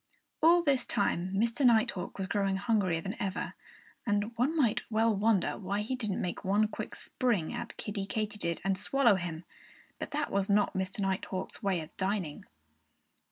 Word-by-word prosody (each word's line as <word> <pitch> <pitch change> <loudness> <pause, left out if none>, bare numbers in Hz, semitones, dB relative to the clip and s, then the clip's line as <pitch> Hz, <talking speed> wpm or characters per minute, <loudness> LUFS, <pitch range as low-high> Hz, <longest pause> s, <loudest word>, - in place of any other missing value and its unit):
All 340 +2 +6
this 275 -5 +2
time 185 -4 0
Mr. 230 +7 +1
Nighthawk 230 -5 +3
was 195 - -2
growing 195 0 0
hungrier 195 -5 +1
than 195 +5 -4
ever. 195 -2 -2 0.5
And 205 +1 0
one 265 +8 +1
might 240 -8 +3
well 225 0 +3
wonder 205 -2 +2
why 200 +1 -1
he 230 +5 -2
didn't 215 -6 -2
make 180 - -3
one 205 +3 +3
quick - - -6
spring 230 -11 -1
at - - -6
Kiddie 200 -2 -4
Katydid 210 -6 -2
and 195 0 0
swallow 240 +2 +4
him. 175 -3 -3 0.6
But - - -4
that 300 0 -2
was 200 0 0
not 205 0 +3
Mr. 190 +2 -2
Nighthawk's 190 -1 -2
way 190 -4 +1
of 155 +1 -11
dining. 190 -5 -2
205 Hz, 165 wpm, -31 LUFS, 190-230 Hz, 0.6 s, All